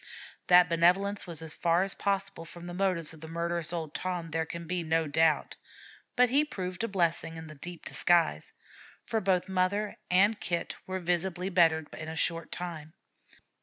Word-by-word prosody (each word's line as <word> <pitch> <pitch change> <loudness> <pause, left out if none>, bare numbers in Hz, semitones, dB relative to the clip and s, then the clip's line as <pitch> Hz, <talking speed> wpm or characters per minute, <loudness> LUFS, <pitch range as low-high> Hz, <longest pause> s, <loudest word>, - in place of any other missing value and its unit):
That 180 0 +7
benevolence 180 +5 +2
was 165 -2 -4
as 160 -1 -1
far 170 +1 +2
as 195 - -3
possible 195 -3 -2
from 170 +1 -10
the 175 - -6
motives 180 -4 0
of 160 - -14
the 160 - -8
murderous 170 0 -2
old 160 -3 -4
Tom 175 -3 -3
there 160 0 -1
can 170 +1 -6
be 180 +1 -1
no 165 0 +1
doubt; 155 0 +2 0.6
but 250 -1 +4
he 285 +3 +5
proved 185 -9 -5
a - - +1
blessing 170 -4 0
in 160 - -7 0.2
deep 175 -1 -8
disguise, 170 - +2 0.5
for 220 - -1
both 185 -1 +1
mother 190 +3 0
and 200 +4 +4
Kit 170 -1 -2
were 190 0 -3
visibly 180 +1 -1
bettered 165 -4 +3
in 160 0 -6
a 160 - -5
short 165 0 -1
time. 160 -3 -6
175 Hz, 175 wpm, -29 LUFS, 165-190 Hz, 0.6 s, That